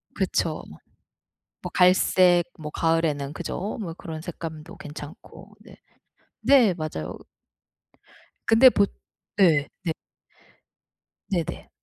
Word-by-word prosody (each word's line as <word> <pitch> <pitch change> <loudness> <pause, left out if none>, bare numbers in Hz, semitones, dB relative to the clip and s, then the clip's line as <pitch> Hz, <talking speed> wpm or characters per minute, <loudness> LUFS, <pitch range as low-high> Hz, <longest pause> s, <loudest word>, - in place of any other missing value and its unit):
그쵸. - - -1 1.0
뭐 - - -6
갈색 180 -1 +5 0.2
뭐 150 -1 -6
가을에는 155 -4 0
그죠? 200 +5 -4
뭐 170 -4 -5
그런 160 -2 -8
색감도 160 -2 -8
괜찮고. 150 +3 -11
네. - - -15 0.7
네 235 -5 +5
맞아요. 155 - -5 1.3
근데 230 +4 +8
보 200 -4 +3 0.5
네. 160 -7 +4 0.2
네. 165 - 0 1.4
네네. 175 -6 -3
165 Hz, 165 characters per minute, -25 LUFS, 155-190 Hz, 1.4 s, 근데